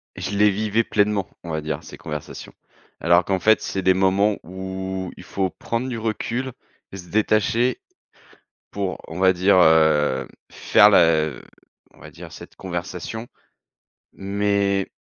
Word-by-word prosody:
je -, -, -5 dB
les 105 Hz, 0 st, +5 dB
vivais 110 Hz, +3 st, 0 dB
pleinement, 105 Hz, -3 st, 0 dB
on 85 Hz, -, -8 dB
va 80 Hz, -, -2 dB
dire 75 Hz, 0 st, -4 dB
ces -, -, -11 dB
conversations. 75 Hz, -1 st, -8 dB, 0.5 s
Alors 85 Hz, +1 st, +4 dB
qu'en 95 Hz, -1 st, 0 dB
fait 110 Hz, +4 st, +3 dB
c'est 95 Hz, -, -3 dB
des 95 Hz, 0 st, +4 dB
moments 95 Hz, +2 st, +2 dB
où 95 Hz, 0 st, -5 dB
il -, -, -11 dB
faut 95 Hz, 0 st, -2 dB
prendre 115 Hz, +6 st, -4 dB
du 120 Hz, -, -4 dB
recul 115 Hz, +4 st, -3 dB, 0.4 s
et 95 Hz, -, -8 dB
se 90 Hz, -2 st, -11 dB
détacher, 110 Hz, +3 st, +1 dB, 0.9 s
pour, 100 Hz, -2 st, -3 dB
on 80 Hz, +3 st, -7 dB
va 95 Hz, 0 st, +4 dB
dire, 95 Hz, +2 st, +3 dB
heu, 75 Hz, -5 st, +3 dB, 0.2 s
faire -, -, +5 dB
la 80 Hz, -2 st, +4 dB, 0.6 s
on -, -, -22 dB
va -, -, -11 dB
dire -, -, -12 dB
cette -, -, -12 dB
conversation, 90 Hz, +5 st, -6 dB, 0.9 s
mais 100 Hz, 0 st, -1 dB
95 Hz, 150 wpm, -22 LUFS, 90-105 Hz, 0.9 s, les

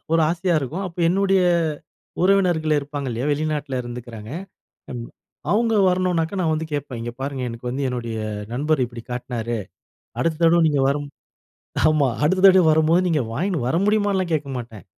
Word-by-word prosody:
ஒரு 165 Hz, -, +4 dB
ஆசையா 175 Hz, +1 st, 0 dB
இருக்கும். 160 Hz, +9 st, -4 dB
அப்ப 180 Hz, -1 st, -11 dB
என்னுடைய 195 Hz, +1 st, +3 dB, 0.8 s
உறவினர்கள் 180 Hz, -5 st, +3 dB
இருப்பாங்க 145 Hz, -1 st, -4 dB
இல்லயா? 120 Hz, +4 st, -2 dB
வெளிநாட்டில 145 Hz, -3 st, -1 dB
இருந்துக்குறாங்க 120 Hz, -2 st, -8 dB, 1.2 s
அவங்க 225 Hz, +2 st, +2 dB, 0.2 s
வரணுனா, 180 Hz, -2 st, +1 dB, 0.2 s
நான் 165 Hz, -3 st, +1 dB
வந்து 160 Hz, +1 st, -2 dB
கேட்பேன், 140 Hz, -4 st, -4 dB
"இங்க 120 Hz, +1 st, -4 dB
பாருங்க, 135 Hz, -1 st, -3 dB
எனக்கு 115 Hz, +1 st, -6 dB
வந்து 135 Hz, +3 st, -2 dB
என்னுடைய 120 Hz, -2 st, -4 dB, 0.4 s
நண்பர் 145 Hz, +1 st, +1 dB
இப்படி 120 Hz, -1 st, -10 dB
காட்டினாரு. 120 Hz, -1 st, -3 dB, 0.6 s
அடுத்த 165 Hz, -1 st, 0 dB
தடவ 170 Hz, +1 st, +5 dB
நீங்க 145 Hz, -3 st, +1 dB
வரும்", 145 Hz, +1 st, -2 dB, 0.8 s
ஆமா, 155 Hz, -3 st, +3 dB, 0.2 s
அடுத்த 185 Hz, +5 st, +2 dB
தடவ 190 Hz, -2 st, +7 dB
வரும்போது 160 Hz, +3 st, +4 dB
நீங்க 155 Hz, -5 st, +1 dB
வாங்கினு 175 Hz, -3 st, -1 dB
வர 160 Hz, -, +1 dB
முடியுமான்னுலாம் 205 Hz, -4 st, +1 dB
கேட்க 150 Hz, -2 st, -2 dB
மாட்டேன். 115 Hz, -6 st, -9 dB
155 Hz, 150 wpm, -22 LUFS, 125-180 Hz, 1.2 s, தடவ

